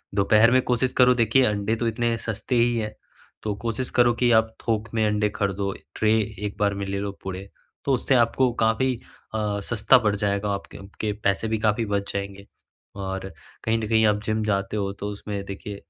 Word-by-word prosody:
दोपहर 105 Hz, +3 st, +5 dB
में 130 Hz, +1 st, +5 dB
कोशिश 125 Hz, +1 st, +1 dB
करो 125 Hz, 0 st, +6 dB
देखिए 115 Hz, +2 st, +3 dB
अंडे 105 Hz, 0 st, 0 dB
तो 115 Hz, +1 st, -1 dB
इतने 115 Hz, +1 st, 0 dB
सस्ते 115 Hz, +3 st, -3 dB
ही 120 Hz, 0 st, +3 dB
हैं, 105 Hz, -1 st, -3 dB, 0.5 s
तो 105 Hz, -, -1 dB
कोशिश 115 Hz, +2 st, -1 dB
करो 120 Hz, 0 st, +6 dB
कि 120 Hz, 0 st, +2 dB
आप 110 Hz, 0 st, +3 dB
थोक 110 Hz, -1 st, 0 dB
में 110 Hz, -1 st, +2 dB
अंडे 105 Hz, 0 st, +1 dB
खरीदो, 100 Hz, 0 st, -1 dB, 0.2 s
ट्रे 110 Hz, 0 st, +2 dB, 0.3 s
एक 100 Hz, -, -4 dB
बार 100 Hz, -1 st, +2 dB
में 100 Hz, 0 st, -3 dB
ले 100 Hz, 0 st, -2 dB
लो 100 Hz, 0 st, -3 dB
पूरे 95 Hz, +1 st, -6 dB, 0.4 s
तो 140 Hz, -, +2 dB
उससे 130 Hz, +1 st, +2 dB
आपको 125 Hz, +1 st, +3 dB
काफ़ी 125 Hz, +4 st, +2 dB, 0.4 s
अ, 105 Hz, -1 st, -1 dB
सस्ता 120 Hz, +4 st, +4 dB
पड़ 105 Hz, -2 st, +1 dB
जाएगा, 100 Hz, 0 st, -1 dB
आपके 100 Hz, 0 st, -5 dB
आपके 100 Hz, +2 st, -4 dB
पैसे 100 Hz, +3 st, +1 dB
भी 110 Hz, -, 0 dB
काफ़ी 110 Hz, +1 st, +1 dB
बच 100 Hz, -1 st, -2 dB
जाएँगे। 100 Hz, 0 st, -5 dB, 0.5 s
और 95 Hz, -1 st, -5 dB, 0.3 s
कहीं 115 Hz, 0 st, +2 dB
न 110 Hz, -, -3 dB
कहीं 110 Hz, -1 st, +4 dB
आप 105 Hz, 0 st, +2 dB
जिम 110 Hz, 0 st, -1 dB
जाते 100 Hz, 0 st, -1 dB
हो 100 Hz, -1 st, -1 dB
तो 105 Hz, -, -3 dB
उसमें 100 Hz, 0 st, -5 dB
देखिए 100 Hz, +1 st, -7 dB
105 Hz, 200 wpm, -24 LUFS, 100-115 Hz, 0.5 s, करो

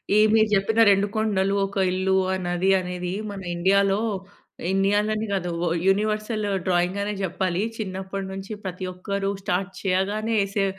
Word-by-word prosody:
ఈ -, -, +6 dB, 0.2 s
మీరు 220 Hz, 0 st, +5 dB
చెప్పిన 215 Hz, +3 st, +1 dB
2 200 Hz, 0 st, +4 dB
కొండలు, 200 Hz, -3 st, +1 dB
ఒక 195 Hz, 0 st, -7 dB
ఇల్లు, 190 Hz, +1 st, +1 dB, 0.2 s
ఆ -, -, +1 dB
నది, 175 Hz, +2 st, +1 dB
అనేది 180 Hz, 0 st, -4 dB, 0.2 s
మన 195 Hz, -, -7 dB
ఇండియాలో, 195 Hz, +3 st, +3 dB, 0.7 s
ఇండియాలోనే 205 Hz, +3 st, +1 dB
కాదు 180 Hz, -2 st, -1 dB, 0.2 s
ఓహ్! 170 Hz, -, +1 dB
యూనివర్సలు 215 Hz, +1 st, +1 dB, 0.2 s
డ్రాయింగ్ 180 Hz, +2 st, +1 dB
అనే 210 Hz, -, -2 dB
చెప్పాలి. 185 Hz, 0 st, -1 dB, 0.2 s
చిన్నప్పటినుంచి 190 Hz, 0 st, -5 dB
ప్రతి 185 Hz, 0 st, -4 dB
ఒక్కరూ 195 Hz, +2 st, -2 dB
స్టార్ట్ 185 Hz, +1 st, -1 dB
చేయగానే 205 Hz, +4 st, 0 dB
ఏసే 195 Hz, 0 st, 0 dB
195 Hz, 140 wpm, -24 LUFS, 185-205 Hz, 0.7 s, ఈ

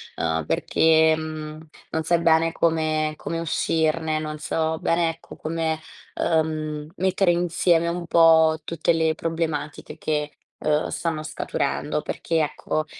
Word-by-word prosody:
uhm, 80 Hz, -1 st, -1 dB
perché 160 Hz, 0 st, +3 dB
non 155 Hz, 0 st, -6 dB
sai 170 Hz, +1 st, +2 dB
bene 165 Hz, 0 st, +3 dB
come 155 Hz, -2 st, +1 dB
come 165 Hz, 0 st, -4 dB
uscirne, 160 Hz, -1 st, 0 dB
non 155 Hz, -1 st, -5 dB
so 160 Hz, +1 st, -1 dB
bene, 165 Hz, 0 st, +1 dB
ecco, 165 Hz, +1 st, -9 dB
come, 160 Hz, 0 st, -2 dB, 0.4 s
uhm, 155 Hz, -2 st, -1 dB
mettere 190 Hz, 0 st, +2 dB
insieme 170 Hz, -1 st, +2 dB
un 170 Hz, 0 st, -4 dB
po' 160 Hz, -1 st, +5 dB
tutte 165 Hz, +1 st, 0 dB
le 160 Hz, -1 st, +1 dB
problematiche 160 Hz, -2 st, -3 dB
che, 150 Hz, -1 st, -2 dB, 0.3 s
uhm, 150 Hz, 0 st, +1 dB
stanno 160 Hz, -2 st, -3 dB
scaturendo. -, -, -2 dB
Perché, 165 Hz, -1 st, -2 dB
ecco, 155 Hz, +1 st, -2 dB
160 Hz, 125 wpm, -24 LUFS, 155-165 Hz, 0.4 s, po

